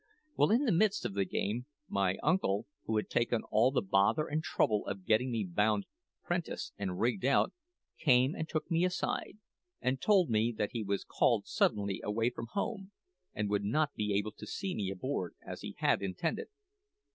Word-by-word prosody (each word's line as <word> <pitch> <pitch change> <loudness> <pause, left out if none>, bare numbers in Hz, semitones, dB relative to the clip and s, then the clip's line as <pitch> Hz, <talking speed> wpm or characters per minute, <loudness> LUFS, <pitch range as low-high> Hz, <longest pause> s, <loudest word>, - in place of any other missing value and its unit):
"Well, - - +4
in 240 +7 +3
the 235 - +3
midst 205 +4 +2
of - - -2
the 100 -1 +1
game, 110 +7 -2 0.2
my 95 -1 +1
uncle, 150 - +2 0.2
who 110 - 0
had 105 - -1
taken 120 -1 +1
all 110 +4 +5
the 135 - 0
bother 100 +10 +3
and 155 0 -1
trouble 105 -8 +1
of 95 -2 -5
getting 115 +5 +3
me 115 -3 0
bound 105 +3 +1 0.4
'prentice 175 -1 -3
and 95 -3 -3
rigged 115 -3 +1
out, 135 +2 +3 0.5
came 130 -1 +4
and 160 - -4
took 160 +2 -3
me 165 +1 +3
aside, 180 +2 -1 0.4
and 130 +1 -1
told 185 - +4
me 110 +2 +3
that 105 - -1
he 115 - -3
was 100 -1 -1
called - - +2
suddenly 100 -2 +1
away 115 +3 0
from 115 -1 -6
home, 200 -1 -3 0.4
and 105 0 -1
would 100 -1 +1
not 145 +8 +1
be 105 -1 -1
able 105 +2 0
to 105 - -11
see 195 -2 -3
me 100 -3 -2
aboard, 95 -1 -3
as - - -7
he - - -7
had - - +2
intended. 100 - -2
115 Hz, 190 wpm, -32 LUFS, 100-155 Hz, 0.5 s, all